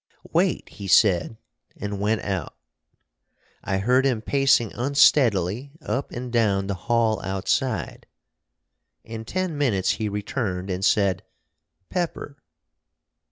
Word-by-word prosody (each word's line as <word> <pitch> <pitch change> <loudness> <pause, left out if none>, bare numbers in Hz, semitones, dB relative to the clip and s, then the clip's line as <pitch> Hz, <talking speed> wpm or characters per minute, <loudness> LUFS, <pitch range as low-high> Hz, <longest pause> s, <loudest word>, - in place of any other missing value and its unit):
"Wait!" - - +1
he 100 - -9
said, 95 +1 +3 0.4
and 100 0 -4
went 105 +1 +1
out. 95 -6 -3 1.1
I 95 - -1
heard 125 +7 +3
him 130 -5 +1
pacing 135 -5 +2
unsteadily 125 - +2
up 140 -3 -3
and 125 0 -6
down 100 -4 +2
the 100 - -2
hall 110 +4 0
outside. 95 +1 -2 1.0
In 115 0 -8
ten 185 +4 -2
minutes 115 -10 +1
he 110 -1 -2
returned, 100 -2 -3
and 90 +1 -3
said, 100 -2 +2 0.7
"Pepper!" 170 -5 -3
110 Hz, 115 wpm, -24 LUFS, 95-130 Hz, 1.1 s, said